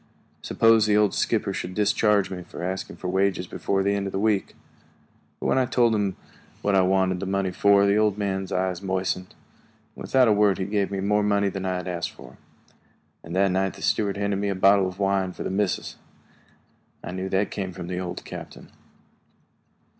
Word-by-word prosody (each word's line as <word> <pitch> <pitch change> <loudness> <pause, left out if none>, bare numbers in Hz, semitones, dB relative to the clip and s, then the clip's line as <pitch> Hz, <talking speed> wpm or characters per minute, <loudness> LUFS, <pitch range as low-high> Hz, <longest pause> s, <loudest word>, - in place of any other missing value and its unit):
Suppose 115 -1 +4
the 105 0 +3
old 105 -2 +3
skipper - - 0
should 90 +1 -5
discharge 105 -1 +2
me 90 -1 -5
for 85 0 -9
asking 95 +1 -4
for 90 - -6
wages 95 0 +1
before 95 +2 -1
the 100 +1 +1
end 100 -1 -2
of - - -4
the - - -3
week? 105 -1 0 0.8
But - - -6
when - - +2
I 130 - +1
told 120 -2 +3
him 100 -3 0 0.5
what 100 - +1
I 95 - +5
wanted 95 0 +2
the 100 - -4
money 95 -1 0
for, 100 +2 +4
the 100 +1 +3
old 105 -2 +2
man's 95 -2 -2
eyes 90 -1 -1
moistened. 95 -1 -2 0.6
Without 130 -2 +2
a - - +4
word 105 -2 +3
he 95 - -2
gave 100 0 0
me 100 -1 -3
more 105 +1 +2
money 100 -1 +2
than 95 0 -4
I 95 - -1
had 90 0 -5
asked 85 -2 -3
for, - - -14 0.8
and 85 +2 -7
that 95 0 +3
night 95 +1 0
the - - -10
steward 100 -2 0
handed 100 -1 -1
me 100 0 -1
a 100 - -1
bottle 95 0 +4
of 90 0 -7
wine 95 -2 0
for - - -7
the - - -3
"missus." 100 0 -2 1.1
I - - -6
knew 95 +1 -4
that 95 - +1
it 105 - -3
came 95 -2 -4
from 90 -1 -8
the 90 +1 -4
old 90 -1 -6
captain. - - -10
95 Hz, 205 wpm, -25 LUFS, 95-100 Hz, 1.1 s, I